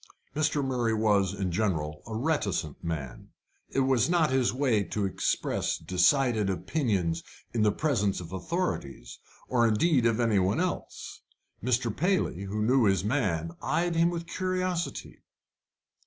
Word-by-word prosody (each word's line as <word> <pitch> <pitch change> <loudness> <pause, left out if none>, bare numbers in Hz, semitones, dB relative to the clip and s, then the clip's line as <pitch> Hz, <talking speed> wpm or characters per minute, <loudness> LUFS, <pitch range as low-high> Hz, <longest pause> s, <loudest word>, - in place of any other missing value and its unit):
Mr. 150 -2 +1
Murray 120 -4 0
was, 105 -4 +2
in 100 -2 -3
general, 80 -6 -1
a 110 - -5
reticent 110 - -1
man. 75 -7 -5 0.4
It 135 - 0
was 130 0 +2
not 170 -4 +3
his 130 -2 +2
way 125 -6 +1
to 100 +3 -2
express 95 - -1
decided 105 +4 +2
opinions 95 - -1 0.3
in 115 - 0
the 105 -1 +4
presence 105 -6 0
of 85 -1 -9
authorities, 95 - -3 0.3
or 120 -2 +3
indeed 120 +3 +3
of 115 0 +1
any 115 -4 +3
one 95 - +1
else. 180 0 -4 0.4
Mr. 120 -2 0
Paley, 175 - 0
who 105 +2 -2
knew 125 +1 +4
his 95 -2 +2
man, 95 - 0
eyed 175 0 0
him 165 +1 +4
with 170 -1 -4
curiosity. 185 -1 -3
110 Hz, 140 wpm, -28 LUFS, 95-145 Hz, 0.4 s, the